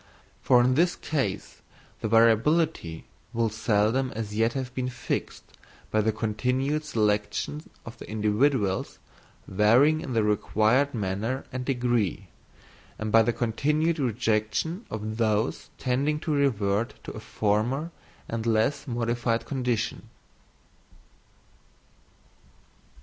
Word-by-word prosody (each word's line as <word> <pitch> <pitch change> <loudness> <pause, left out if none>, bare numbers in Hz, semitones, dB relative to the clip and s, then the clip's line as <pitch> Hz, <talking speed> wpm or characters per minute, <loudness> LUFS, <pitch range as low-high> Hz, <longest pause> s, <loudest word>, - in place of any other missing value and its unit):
For 125 -1 +5
in 130 +1 +3
this 175 +6 +2
case 115 -11 -3 0.4
the - - -2
variability 115 - +2 0.3
will 115 -1 +1
seldom 110 +4 +1
as 110 -2 -4
yet 115 +2 +2
have 130 -2 -4
been 125 0 -2
fixed 125 - -4 0.5
by 110 - +3
the 110 +1 +2
continued 125 +7 -1
selection 105 +3 -1 0.2
of 115 - -10
the - - -10
individuals 105 -1 +1 0.5
varying 120 +11 +4
in 130 - -5
the 115 -2 +2
required 110 +6 +2
manner 110 +6 -2
and 130 0 -4
degree, 120 -7 -1 0.7
and 110 0 -3
by 115 - +7
the 115 +2 +2
continued 150 +8 0
rejection 120 - -1
of 110 0 -4
those 110 0 0
tending 140 +4 0
to 155 - -1
revert 115 -6 +1
to - - -6
a - - -8
former 110 - -1 0.4
and 115 0 -3
less 115 +6 +1
modified 120 -1 -1
condition. 125 -4 -2
115 Hz, 115 wpm, -26 LUFS, 110-135 Hz, 0.7 s, by